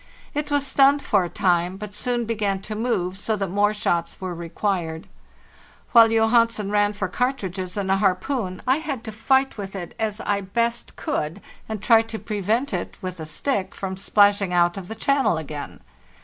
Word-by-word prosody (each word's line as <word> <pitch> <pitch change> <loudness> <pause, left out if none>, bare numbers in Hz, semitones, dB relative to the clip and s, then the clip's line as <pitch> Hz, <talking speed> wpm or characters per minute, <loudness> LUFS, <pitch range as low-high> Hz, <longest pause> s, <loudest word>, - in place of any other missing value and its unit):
It 295 0 -2
was 285 -1 +1
stunned 280 +1 +4
for 200 -3 +2
a 175 - -4
time, 180 +1 +1
but 210 0 -7
soon 240 +2 -1
began 210 -4 -1
to 215 - -5
move, 195 -5 -1
so 220 +2 0
that 195 -2 -2
more 205 +2 +3
shots 175 -6 -1
were 185 -1 -4
required. 170 -1 -3 0.9
While 230 -2 +8
Johansen 225 -2 +2
ran 205 0 +2
for 200 -2 -2
cartridges 190 -5 -2
and 195 -1 -1
a 195 - +4
harpoon 195 +1 -1
I 260 +2 +3
had 295 -7 -4
to 220 - -5
fight 265 +3 +1
with 195 -1 -6
it 175 -3 -6
as 220 -1 -1
I 200 -1 0
best 235 +4 -2
could, 155 +6 -3 0.3
and 215 -2 -4
try 225 +1 +6
to 225 0 -6
prevent 220 +6 -1
it, - - -4
with 185 -3 -6
a 160 - -6
stick, 195 - -2
from 190 -1 -4
splashing 200 0 +3
out 175 -1 +3
of 195 -3 -7
the 220 - -6
channel 270 - +2
again. 150 -2 -7
205 Hz, 185 wpm, -23 LUFS, 185-230 Hz, 0.9 s, While